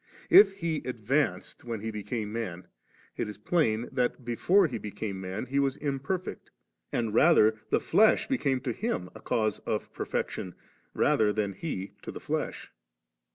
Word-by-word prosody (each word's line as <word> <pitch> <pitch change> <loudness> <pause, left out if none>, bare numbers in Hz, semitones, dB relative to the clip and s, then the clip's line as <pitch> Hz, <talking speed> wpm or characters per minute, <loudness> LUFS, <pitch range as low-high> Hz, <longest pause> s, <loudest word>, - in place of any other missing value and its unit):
If 195 -2 +9
He 170 -5 -2
advanced 125 +4 -1
3 120 - -12
when 115 -2 -2
He 110 +1 -3
became 105 0 -4
man, 95 -6 -4 0.5
it - - -2
is 105 - -8
plain 115 -1 +1
that, 125 0 -1
before 180 - +3
He 125 -8 -3
be 105 - -6
came 100 -2 -5
man. 95 +5 -4
He 140 +2 0
was 135 -1 +1
imperfect; 145 +6 -3 0.4
and 115 -3 -1
rather 110 -6 +5
the - - +3
flesh 220 +1 +4
became 140 - 0
to 125 -1 -2
Him 115 - -3
a - - -12
cause 110 -2 0
of - - -3
perfection, 90 -2 -3 0.4
than 105 -2 +2
He 95 - -5
to - - -6
the - - -8
flesh. - - -3
120 Hz, 160 wpm, -29 LUFS, 105-145 Hz, 0.5 s, If